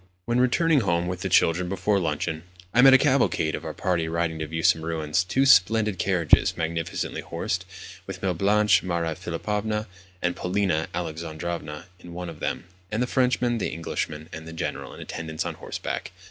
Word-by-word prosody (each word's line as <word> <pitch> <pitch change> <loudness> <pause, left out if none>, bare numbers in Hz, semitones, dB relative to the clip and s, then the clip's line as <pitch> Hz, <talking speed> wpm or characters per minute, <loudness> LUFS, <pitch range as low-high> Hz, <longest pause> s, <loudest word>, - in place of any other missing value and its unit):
When 120 +1 +1
returning 150 +5 +3
home 85 -6 +1
with 90 0 -4
the 95 - -2
children 90 +1 +3
before 100 +2 +1
luncheon, 80 -1 -2 0.3
I 120 - +6
met 135 +1 +9
a - - +9
cavalcade 130 - +2
of - - -4
our - - -5
party 85 -3 0
riding 80 0 -1
to 80 - -3
view 80 +1 -4
some 85 -2 +4
ruins. 80 +1 0
Two 130 +10 +1
splendid 105 -4 +4
carriages, 90 -6 +3
magnificently 80 0 -2
horsed, 90 +1 -3 0.4
with 95 -1 -7
Mlle. 95 -2 +1
Blanche, 100 +1 +3
Maria 85 -3 -1
Philipovna, 105 +6 -2 0.3
and 90 0 -1
Polina 90 -4 0
Alexandrovna 80 -1 -5
in 85 -1 -11
one 90 -1 -5
of 80 -2 -10
them, - - -2 0.3
and 110 +3 0
the - - +1
Frenchman, 125 -2 +1
the - - -1
Englishman, 80 -1 -4
and 80 0 -8
the 80 - -8
General 80 - -4
in - - -10
attendance 80 -1 -4
on - - -3
horseback! - - -5
90 Hz, 180 wpm, -25 LUFS, 80-105 Hz, 0.4 s, met